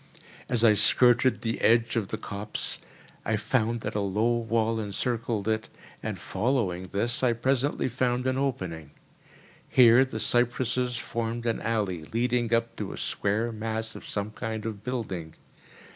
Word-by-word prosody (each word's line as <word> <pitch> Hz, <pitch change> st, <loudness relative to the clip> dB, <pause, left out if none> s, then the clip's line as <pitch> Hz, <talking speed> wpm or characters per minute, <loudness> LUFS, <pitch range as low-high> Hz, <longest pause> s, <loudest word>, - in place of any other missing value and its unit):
As 120 Hz, -2 st, +2 dB
I 110 Hz, -2 st, +7 dB
skirted 120 Hz, +4 st, +5 dB
the 115 Hz, 0 st, -2 dB
edge 115 Hz, 0 st, +3 dB
of 110 Hz, -4 st, 0 dB
the 110 Hz, -, -4 dB
copse, 105 Hz, -1 st, -3 dB, 0.4 s
I 110 Hz, -, 0 dB
found 115 Hz, +1 st, 0 dB
that -, -, -4 dB
a 105 Hz, -, -1 dB
low 105 Hz, +4 st, +1 dB
wall 115 Hz, -1 st, 0 dB
encircled 110 Hz, 0 st, -2 dB
it, 110 Hz, 0 st, -1 dB, 0.3 s
and -, -, -4 dB
following 95 Hz, -5 st, -1 dB
this 115 Hz, +6 st, -1 dB
I 125 Hz, -2 st, +3 dB
presently 130 Hz, +4 st, 0 dB
found 125 Hz, 0 st, 0 dB
an 130 Hz, 0 st, +1 dB
opening. 90 Hz, -, -3 dB, 0.8 s
Here 125 Hz, 0 st, +7 dB
the 135 Hz, -, -5 dB
cypresses 125 Hz, 0 st, +1 dB
formed 115 Hz, 0 st, -3 dB
an 115 Hz, -1 st, 0 dB
alley 100 Hz, -8 st, -1 dB
leading 120 Hz, +3 st, 0 dB
up 115 Hz, 0 st, +1 dB
to -, -, -4 dB
a -, -, -8 dB
square 110 Hz, +4 st, -1 dB
mass 110 Hz, 0 st, -3 dB
of -, -, -10 dB
some 105 Hz, +1 st, -3 dB
kind 110 Hz, 0 st, -5 dB
of 105 Hz, -2 st, -5 dB
building. 95 Hz, -11 st, -4 dB
115 Hz, 155 wpm, -27 LUFS, 105-120 Hz, 0.8 s, I